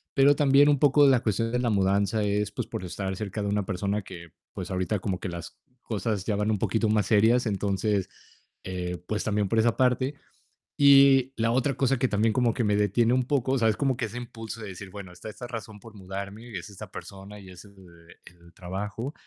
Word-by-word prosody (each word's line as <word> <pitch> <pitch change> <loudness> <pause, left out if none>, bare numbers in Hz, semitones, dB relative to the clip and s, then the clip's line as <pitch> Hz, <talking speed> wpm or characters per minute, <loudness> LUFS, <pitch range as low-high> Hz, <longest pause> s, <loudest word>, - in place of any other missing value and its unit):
pero 140 +1 +5
también 140 0 +5
un 145 -2 +3
poco 145 0 +5
la 130 -2 +5
cuestión 115 +2 -1
de 125 - 0
la 120 -1 0
mudanza 100 +1 +1
es, 105 0 0
pues, - - -4
por - - -6
estar 95 +2 -4
cerca 105 +1 -4
de - - -2
una 105 0 0
persona 100 +2 -2
que, 85 -3 -11 0.2
pues, - - -6
ahorita 95 +3 -1
como 95 -1 -3
que 95 - -5
las 85 -1 -8 0.2
cosas 105 -3 -2
ya 105 - 0
van 105 +1 0
un 110 - +1
poquito 110 +2 0
más 105 -2 +2
serias, 110 +5 +3
entonces, 100 -1 -1 0.5
eh, 90 -1 -4
pues 105 - -2
también 105 -1 0
por 110 +4 +1
esa 115 0 +2
parte, 130 +2 +1 0.6
y 135 -2 +6
la 115 0 +1
otra 130 +2 +1
cosa 135 +1 +1
que 130 +1 0
también 110 +2 +1
como 120 0 +2
que 120 -2 -1
me 105 0 +2
detiene 105 +4 +2
un 130 0 +2
poco, 130 0 0
o - - +2
sea, 115 -3 +3
es 105 - -1
como 135 0 +1
que 120 - -2
ese 110 +3 -9
impulso 115 -2 -7
de 105 - -6
decir: 95 0 -9
"Bueno, 95 -1 -10
está 90 +5 -9
esta 120 +3 -8
razón 115 -3 -8
por 115 +1 -14
mudarme 100 +4 -7
y 105 - -6
es 90 - -8
esta 100 - -11
persona 100 +1 -10
y 95 -2 -13
es 90 -1 -12
el 100 -1 -18 0.5
el 85 -1 -18
trabajo", 100 +8 -5
105 Hz, 225 wpm, -26 LUFS, 100-120 Hz, 0.6 s, y